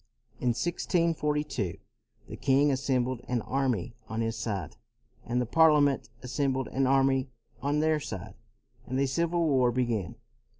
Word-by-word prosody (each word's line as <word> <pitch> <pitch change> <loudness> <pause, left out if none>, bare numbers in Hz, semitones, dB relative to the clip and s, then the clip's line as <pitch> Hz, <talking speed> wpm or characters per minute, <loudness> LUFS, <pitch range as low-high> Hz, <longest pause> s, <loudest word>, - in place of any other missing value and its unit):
In - - -2
1642 150 - 0 0.5
the - - -7
king 140 +2 +3
assembled 130 -2 0
an 120 -3 -1
army 125 -5 -1 0.2
on 110 +1 -2
his 115 0 -1
side, 100 -8 -4 0.5
and 120 +1 -1
the 125 - +1
Parliament 150 0 +4
assem 130 +2 0
bled 130 -1 -3
an 135 0 +1
army 135 0 +3 0.3
on 145 +2 +1
their 155 -1 +2
side, 95 -10 -6 0.5
and 130 +1 -1
a 140 - +3
civil 170 +5 0
war 130 -4 +3
began. 120 -7 -1
130 Hz, 140 wpm, -29 LUFS, 120-145 Hz, 0.5 s, Parliament